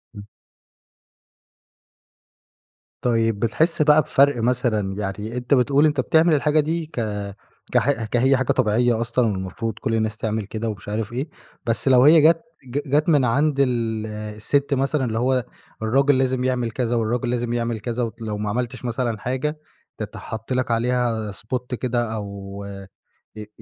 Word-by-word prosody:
إمم. 100 - -8 2.8
طيب، 115 -3 +1
بتحس 155 +9 +1
بقى 150 0 +6
بفرق 140 -3 +3
مثلًا، 115 -6 0
يعني 105 +4 -4
أنت 125 +3 0
بتقول 140 +3 +4
أنت 145 -3 +1
بتعمل 160 +4 +3
الحاجة 150 +1 +3
دي 160 +2 0
ك 155 - -16 0.8
كح 135 -4 +2
ك 120 - -1
هي 130 +2 +4
حاجة 135 - +1
طبيعية 115 +2 +2
أصلًا 120 0 +1
المفروض 100 +4 -4
كل 115 - -1
الناس 110 -1 -1
تعمل 110 -2 -2
كده 110 +2 -4
ومش 105 -1 -7
عارف 110 +2 -3
إيه. 135 +5 -3 0.4
بس 115 +2 -1
لو 130 -1 +6
هي 155 +1 +7
جت 165 +2 +5 0.2
ج 130 +3 -2
جت 150 +4 +1
من 145 -5 +4
عند 140 +4 +1
ال 115 -4 0
الست 105 +7 -1
مثلًا 135 0 +1
اللي 115 -1 -2
هو 125 -1 +1 0.4
الراجل 135 +5 +3
لازم 130 -1 +1
يعمل 125 -3 0
كذا 120 0 -1
والراجل 120 +2 0
لازم 120 -1 -1
يعمل 115 -2 -1
كذا، 120 +3 -2 0.2
ولو 105 -2 -3
ما 105 0 -3
عملتش 125 +2 -3
مثلًا 120 -2 -1
حاجة 130 +6 -2 0.4
تتحط 110 +3 -6
لك 125 -2 0
عليها 115 -2 0
spot 125 +5 -4
كده 120 -2 -1
أو 100 -1 -6
آآ، 100 -1 -8 0.5
آآ 105 -1 -7
120 Hz, 160 wpm, -22 LUFS, 110-135 Hz, 2.8 s, هي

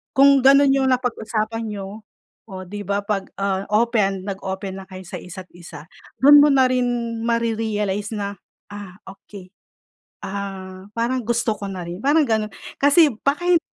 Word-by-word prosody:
Kung 275 0 +6
ganun 275 0 +6
yung 265 -1 +2
napag-usapan 225 -3 -2
niyo 205 +1 -7 0.5
o 185 -1 -8
'di 205 +2 -7
ba? 200 0 0
Pag, 195 -2 -2
ah, 195 -1 -1
open 210 -4 +1
nag-open 190 0 -5
na - - -12
kayo 185 0 -9
sa - - -6
isa't 185 +1 -10
isa 165 -3 -11 0.3
dun 290 +2 +8
mo 295 - +5
na 265 -1 +4
rin 255 -1 +1 0.4
marerealize 220 -3 -1
na, 200 -1 -4 0.4
ah, 200 -3 -9
okey, 190 0 -13 0.7
ah, 190 -1 -6
parang 245 +2 -1
gusto 235 -2 0
ko - - -8
na 185 -2 -6
rin, 175 +4 -7
parang 295 +1 +3
ganun. 215 -1 0 0.3
Kasi 290 +3 +5 0.2
baka 305 +6 0
hindi 345 -2 +4
210 Hz, 155 wpm, -21 LUFS, 195-250 Hz, 0.7 s, dun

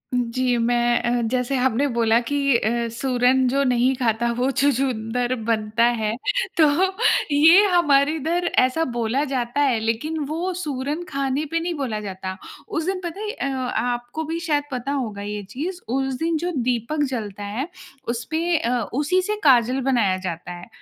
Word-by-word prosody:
जी, 245 0 0
मैं 240 +1 +2
अ, 240 0 0
जैसे 255 +1 0
आपने 260 +2 +2
बोला 230 0 +3
कि 285 - 0 0.2
अ, 235 +2 -1
सूरन 250 +1 +2
जो 275 +3 +1
नहीं 250 0 +2
खाता 235 -1 0
वो 255 +2 +1
छछूंदर 250 -3 0 0.2
बनता 220 0 +1 0.2
है। 215 +1 -1 0.4
तो 315 - +6 0.7
ये 330 +8 +7
हमारे 290 -4 +4
इधर 335 +4 -1
ऐसा 255 +6 +2
बोला 240 +5 0
जाता 245 +2 -1
है, 260 -6 +2
लेकिन 230 +9 -2
वो 345 +5 -2
सूरन 290 +2 -3
खाने 275 +1 -1
पे 330 - +1
नहीं 345 +1 -2
बोला 255 -8 -3
जाता। 190 -2 -6 0.3
उस 320 - -2
दिन 380 +1 -1
पता 345 +2 -5
है 425 0 -3
अ, 455 - -5 0.3
आपको 245 +5 -2
भी 325 +2 -3
शायद 305 -4 0
पता 255 +2 -3
होगा 225 -8 -3
ये 205 0 -5
चीज़, 335 - -4
उस 270 +2 -1
दिन 330 0 0
जो 350 +3 -2
दीपक 250 +4 0
जलता 210 -5 -5
है 220 +9 -3 0.4
उसपे 315 +9 -1
अ, 245 -1 0
उसी 300 +7 +1
से 420 +3 -2
काजल 255 -1 +4
बनाया 235 -8 +2
जाता 180 -2 -5
है। 175 0 -9
255 Hz, 165 wpm, -22 LUFS, 235-300 Hz, 0.7 s, ये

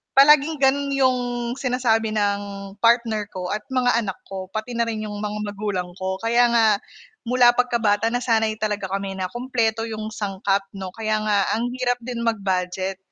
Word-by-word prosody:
palaging 295 +2 +6
ganon 280 +1 +2
'yong 260 -2 +3 0.4
sinasabi 230 -4 +1
ng 205 -1 +1 0.4
partner 230 -2 +2
ko 180 -1 -5
at 210 0 -3
mga 245 -2 +2
anak 190 -4 -4
ko 190 -1 -6
pati 220 +3 -4
na 235 - +2
rin 215 -1 -3
'yong 205 -1 -5
mga 210 0 -3
magulang 195 -3 -3
ko 190 0 -2
kaya 235 +2 +4
nga, 230 -1 +5 0.6
mula 245 0 +6
pagkabata 230 -3 +1
nasanay 230 -2 +1
talaga 210 -2 -2
kami 195 0 -4
na 185 - -2
kumpleto 235 -3 -1
'yong 215 -1 -5
sangkap 195 -1 -1
'no 190 -1 -6
kaya 215 -1 0
nga 205 -2 +2
ang 240 +1 -1
hirap 245 -1 0
din 235 -1 -4
mag-budget. 190 -3 -1
220 Hz, 165 wpm, -23 LUFS, 200-245 Hz, 0.6 s, palaging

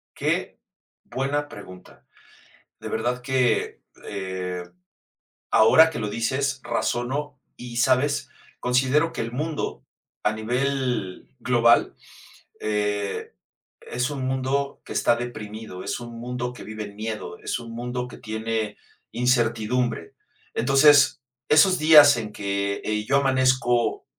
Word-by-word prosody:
Que - - -1 0.5
buena 140 +3 -2
pregunta. 90 -11 -13 0.7
De - - -6
verdad 125 +2 -2
que, 130 -1 0 0.3
eh, 95 -2 -4 0.9
ahora 160 +9 +7
que 155 - -5
lo 105 -2 -2
dices, 130 +5 -1
razono, 130 +4 -2 0.2
¿y 120 -1 -8
sabes? 130 +3 +2 0.3
Considero 130 +6 +2
que - - -4
el 115 - -4
mundo, 150 +4 -4 0.4
a 105 - +2
nivel 125 - -2
global, 120 -1 +3 0.6
eh, 105 -1 -2 0.5
es 125 +2 -2
un 140 -3 -4
mundo 130 +2 -1
que - - -7
está 120 - +3
deprimido, 110 -5 -7
es - - -3
un 120 -1 -9
mundo 125 0 -4
que - - -10
vive 110 0 -6
en 100 -1 -10
miedo, 110 -4 -5
es - - -3
un 115 -1 -9
mundo 125 +1 -4
que - - -11
tiene 110 -1 -3 0.3
incertidumbre. 120 -4 0 0.4
Entonces, 140 +3 +5 0.3
esos 185 +4 +5
días 150 -3 +8
en 110 -2 -5
que, 100 0 -2
eh, 105 0 -2
yo 140 +5 +3
amanezco 130 -3 +2
120 Hz, 120 wpm, -24 LUFS, 110-130 Hz, 0.9 s, días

